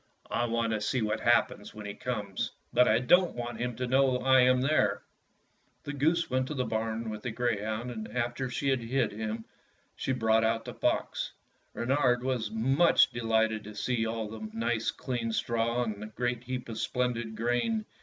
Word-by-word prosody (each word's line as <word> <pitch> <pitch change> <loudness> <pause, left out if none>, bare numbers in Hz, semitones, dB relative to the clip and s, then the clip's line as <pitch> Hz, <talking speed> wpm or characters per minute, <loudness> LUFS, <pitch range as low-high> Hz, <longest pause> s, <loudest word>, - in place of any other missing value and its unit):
I 120 - +1
want 115 -1 0
to 105 - -1
see 115 +3 0
what 105 +1 0
happens 115 -3 +1
when 105 -1 -8
he 100 - -4
comes, 105 -6 -3 0.2
but 125 +1 +5
I 110 - +5
don't 175 +9 +4
want 120 -1 -5
him 120 -1 -2
to 125 - -2
know 130 0 +3
that - - -7
I 130 0 +6
am 125 0 +5
there." 150 +4 +2 0.8
The 145 - -5
goose 160 +4 +2
went 130 0 0
to 150 - -4
the 130 -2 0
barn 110 0 -2
with* 105 -1 -6
the 120 - -3
grey 120 -2 -1
hound, 110 +3 -3
and 110 -2 -6
after 120 +3 -2
she 135 +3 -1
had 130 -1 +2
him 115 - -7
hid 110 -3 -1 0.5
she - - -2
brought 115 -2 +2
the - - -6
fox. - - -1 0.4
Reynard 125 0 +2
was 125 -5 -1
much 135 +11 +4
delighted 110 -2 +1
to 105 0 -10
see 115 +2 0
all 110 -1 -3
the 110 0 -7
nice 115 0 0
clean 120 -3 -3
straw 115 +1 0
and 105 -3 -4
the 110 - -5
great 120 +2 -2
heap 125 0 -4
of 115 -2 -5
splendid 120 -3 -1
grain. 120 - 0
120 Hz, 195 wpm, -30 LUFS, 110-125 Hz, 0.8 s, I